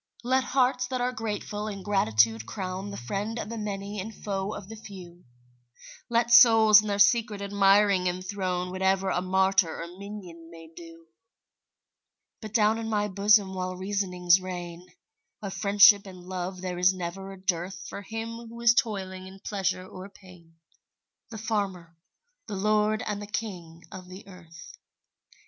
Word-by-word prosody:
Let 260 +2 +2
hearts 250 -1 +1
that 255 0 -3
are 250 +1 0
grateful 210 -2 -4
in 200 -3 -6
gratitude 110 - +2
crown 185 - -5
The 200 - -7
friend 200 - -4
of 210 - -5
the 230 - -5
many 200 0 -5
and 210 +4 -5
foe 195 -2 -4
of 190 - -9
the 225 - -9
few; 180 -5 -12 0.8
Let 235 0 +1
souls 225 -3 +8
in 215 - -7
their 200 -1 -1
secret 220 0 +3
admiring 200 -1 +3
enthrone 185 0 -3
Whatever 190 +1 0
a 180 - 0
martyr 190 -2 +1
or 165 - -4
minion 185 -5 -10
may 165 -1 -13
do; 165 -1 -13 1.4
But 215 -2 -8
down 220 0 +2
in 225 0 -4
my 210 -1 0
bosom 200 0 +3
while 185 0 -4
reasonings 185 -2 +1
reign, 175 -1 -7 0.6
Of 195 -2 -4
friendship 205 0 +5
and 185 -2 -11
love 185 0 -5
there 180 -1 -4
is 185 +1 +4
never 185 +2 -6
a 195 - -11
dearth 180 0 -3
For - - -7
him 230 +2 -7
who 235 +1 -10
is 235 0 +6
toiling 190 -5 -2
in 190 +1 -13
pleasure 190 -2 -2
or 185 +1 -10
pain, 180 -4 -18 0.7
The 225 - -8
farmer, 195 -6 -3 0.5
the 205 - -5
lord 215 +2 +1
and 210 -1 -3
the 205 - -7
king 180 -6 -6
of 185 -1 -10
the 185 +2 -11
earth. 170 -4 -14
195 Hz, 160 wpm, -27 LUFS, 180-210 Hz, 1.4 s, souls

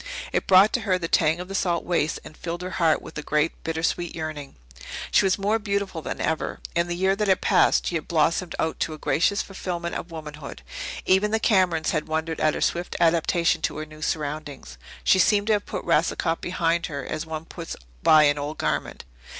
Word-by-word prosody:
It - - 0
brought 195 +2 +6
to - - +2
her 190 -4 +1
the 170 -2 -3
tang 160 0 +2
of 180 - -6
the 195 - -7
salt 175 -3 0
wastes 165 -3 0
and 155 - -12
filled 170 +2 -5
her 185 - -5
heart 160 -2 +3
with - - -11
a - - -3
great, 150 +2 -1
bitter 160 0 -3
sweet 175 +1 -1
yearning. 155 -3 -6 0.6
She - - +4
was 190 - +2
more 210 +3 +1
beautiful 200 -5 -2
than - - -5
ever. 160 0 -2 0.2
In 170 0 +2
the 175 - -2
year 190 +2 +2
that 210 +1 -1
had 190 -1 +3
passed - - +3
she - - -2
had 160 -3 -2
blossomed 165 +2 +1
out 160 - -1
to 160 - -1
a - - -11
gracious 165 +8 +1
fulfilment 175 -3 -5
of 170 - -5
womanhood. 150 - -8 0.4
Even 190 +3 +3
the 220 +1 +1
Camerons 185 -7 +2
had 155 - -1
wondered 160 +1 -2
at 155 -1 +2
her - - -4
swift 175 +1 -1
adaptation 170 0 +2
to - - -2
her 155 - -4
new 155 0 -14
surroundings. 150 -2 -4 0.2
She 190 - +4
seemed 205 +2 +4
to 220 - +3
have 205 -1 -1
put - - -5
Racicot 165 +1 +1
behind 170 -1 0
her 140 -4 -5
as 160 +1 -4
one 160 0 -5
puts 165 0 -7 0.3
by 155 - +7
an 145 0 +3
old 145 +2 -4
garment. - - -2
165 Hz, 215 wpm, -25 LUFS, 155-185 Hz, 0.6 s, by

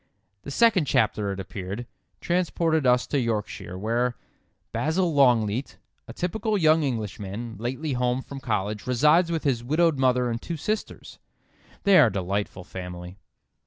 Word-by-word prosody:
The - - -9
second 200 +1 +3
chapter, 105 -5 +1
it 95 - -5
appeared, 95 +4 -6 0.4
transported 165 -4 +1
us 125 0 +4
to 145 - 0
Yorkshire 110 -6 -3
where: 120 +4 0 0.6
"Basil 165 +2 0
Longleat, 125 -3 +2 0.3
a 115 - -8
typical 210 - -1
young 160 -2 +4
Englishman, 110 -3 -4
lately 130 +6 -3
home 125 +1 0
from 140 - -8
college, 105 -4 -2
resides 150 +8 +4
with 165 -2 -1
his 125 -5 0
widowed 155 +2 +2
mother 125 -2 +2
and 115 - -3
two 170 - -5
sisters. 215 +8 -4 0.6
They 200 -2 +6
are - - +7
a - - -1
delightful 95 0 -3
family." 90 +1 -8
125 Hz, 145 wpm, -25 LUFS, 105-155 Hz, 0.6 s, are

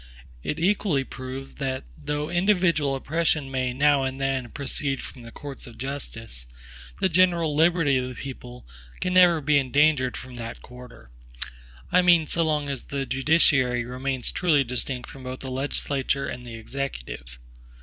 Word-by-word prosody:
It 150 - -3
equally 175 -4 +2
proves, 130 +1 -7
that 130 -1 -2
though 150 - -3
individual 175 -6 +2
oppression 150 0 0
may 130 -1 0
now 140 +2 +4
and 130 0 -2
then 135 -2 -1
proceed 140 0 -2
from 125 - -9
the 115 0 -10
courts 140 -1 -8
of 115 -2 -12
justice, 115 - -4 0.5
the - - +3
general 170 -3 +3
liberty 165 -3 +4
of 125 0 -2
the 125 - -8
people 125 -2 -8 0.3
can 180 - -1
never 175 -3 +6
be 150 0 +4
endangered 140 -1 +2
from 130 0 -9
that 115 0 -7
quarter; 125 - -13 0.8
I 180 - +6
mean 175 -3 +5
so 170 - 0
long 150 -2 0
as 140 -3 -4
the 140 -1 -3
judiciary 130 -3 +3
remains 130 +1 -2
truly 160 -7 +3
distinct 125 0 -1
from 135 - -11
both 130 0 -6
the 130 - -5
legislature 140 0 -1
and 125 0 -6
the 115 - -7
Executive. 65 - -6
135 Hz, 160 wpm, -25 LUFS, 125-150 Hz, 0.8 s, never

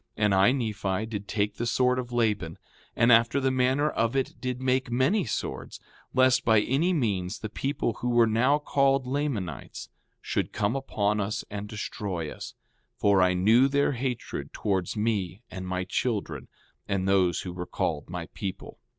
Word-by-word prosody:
5:14 110 - +2
And 105 - +3
I, 95 +5 +5
Nephi, 110 -5 -1
did 105 -2 -6
take 105 -1 -1
the 120 - -2
sword 125 +2 +2
of 125 -1 -5
Laban, 105 -9 0 0.4
and 115 +1 +4
after 115 +3 +5
the 135 -1 +1
manner 130 +3 +2
of 115 +2 0
it 135 - 0
did 125 0 -3
make 130 -1 0
many 130 - +2
swords, 105 - -4 0.3
lest 130 0 +4
by 110 -2 +5
any 140 - +1
means 105 - -1
the 110 - -6
people 135 -1 -1
who 125 - 0
were 120 -1 +5
now 115 +6 +3
called 135 -2 +2
Lamanites 125 - -3 0.3
should - - -2
come 105 +3 0
upon 105 -6 0
us 105 +2 -3
and 105 0 -5
destroy 95 -6 -4
us; - - -9 0.4
for 100 -2 +4
I 90 0 +3
knew 110 +8 +5
their 140 +1 +2
hatred 125 -2 -4
towards 95 -1 -1
me 105 -2 -1
and 95 0 -6
my 90 0 -2
children 95 - -2 0.4
and 95 -1 -1
those 95 -3 +2
who 90 - -6
were 90 0 -6
called - - -2
my - - -5
people. 95 0 -6
110 Hz, 175 wpm, -27 LUFS, 100-130 Hz, 0.4 s, I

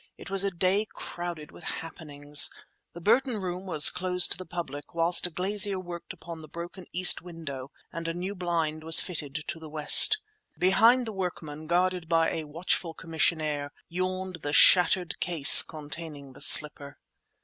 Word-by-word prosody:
It - - -12
was 195 0 +2
a 200 - 0
day 190 +4 -1
crowded 175 -3 -8
with - - -16
happenings. 145 -3 -1 0.4
The 175 - -11
Burton 235 +5 +1
Room 185 -1 -6
was 155 -5 +5
closed 180 -1 0
to - - -1
the 185 - -9
public, 155 -3 -8
whilst 170 +2 +2
a - - -10
glazier 195 +3 0
worked 175 -2 -9
upon 170 -3 -11
the 155 - -13
broken 175 +3 -10
east 180 +1 +3
window 150 -7 -9 0.2
and 165 +1 -6
a 165 - -3
new 185 +3 -5
blind 165 -4 -4
was 160 0 +5
fitted 150 -4 -5
to 165 - -6
the 160 -1 -12
west. 155 - +5 0.4
Behind 230 +7 +3
the 220 - -7
workmen, 155 -5 -7
guarded 180 0 -1
by 165 -1 +1
a 160 - -5
watchful 165 +2 -3
commissionaire, 155 -3 -2 0.2
yawned 185 +1 -5
the 145 -2 -6
shattered 180 0 +3
case 165 -5 +8
containing 150 -2 -9
the - - -12
slipper. 145 -1 +4
170 Hz, 165 wpm, -26 LUFS, 155-185 Hz, 0.4 s, case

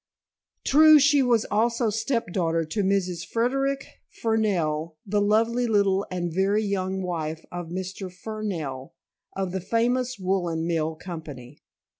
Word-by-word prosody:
True, 310 +2 +7
she 290 0 +5
was 240 -4 +2
also 230 +1 +1
step 220 -3 -1
daughter 165 -3 0
to 205 +7 -2
Mrs. 185 -3 0
Frederic 270 +5 0 0.2
Fernell, 170 -9 -1
the 205 0 +1
lovely 230 +4 +2
little 200 -3 +2
and 175 -2 -3
very 195 +4 +2
young 190 -2 -2
wife 160 -3 -4
of 175 -1 -5
Mr. 185 +2 -5
Fernell 180 -10 -5 0.4
of 190 -2 -2
the 190 0 -3
famous 245 +5 0
woolen 180 -4 -1
mill 160 -2 -1
company. 150 -6 -9
190 Hz, 130 wpm, -25 LUFS, 170-225 Hz, 0.4 s, True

